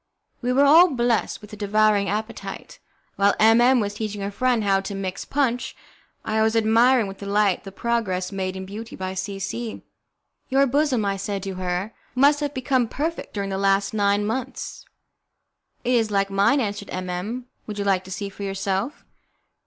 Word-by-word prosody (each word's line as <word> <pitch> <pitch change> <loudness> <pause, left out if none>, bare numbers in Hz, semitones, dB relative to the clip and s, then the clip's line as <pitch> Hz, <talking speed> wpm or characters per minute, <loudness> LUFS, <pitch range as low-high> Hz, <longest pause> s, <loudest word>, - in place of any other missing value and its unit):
We 250 0 0
were 275 +3 +4
all 325 +6 +8
blessed 240 -6 0
with 210 0 -13
a - - -5
devouring 210 0 +2
appetite. 220 - -5 0.4
While 200 0 +4
M 225 +2 +6
M 250 +1 +5
was 205 -2 -1
teaching 210 -1 -4
her 200 +1 -3
friend 245 +1 +1
how 195 -1 +2
to 195 +1 -5
mix 195 -1 -4
punch, 255 -4 -1 0.5
I 220 0 +1
was 220 +1 +2
admiring 230 +2 +4
with 195 0 -8
delight 200 -1 +1
the 195 - -7
progress 195 -4 -1
made 190 -1 -3
in 190 0 -6
beauty 215 +4 -8
by 185 0 -4
C 195 +1 -4
C. 220 +4 -5 0.7
"Your 275 +1 +4
bosom," 270 -4 +1
I 195 0 0
said 195 0 -3
to 195 -1 -4
her, 185 +3 -3 0.2
"must 285 +3 +5
have 290 -2 -2
become 255 -1 +1
perfect 315 +4 -4
during 200 -1 -2
the 190 - -2
last 195 0 +2
nine 205 -1 +2
months." 250 +5 -4 1.0
"It 250 - +1
is 225 -3 +2
like 200 -1 0
mine," 200 +9 +3
answered 205 -4 -3
M 185 0 -4
M, 205 +8 -4 0.2
"would 210 -1 -5
you 200 - -2
like 190 -2 +2
to 190 - -10
see 200 +1 -4
for 200 - -13
yourself?" 195 +5 -2
210 Hz, 185 wpm, -23 LUFS, 195-240 Hz, 1.0 s, all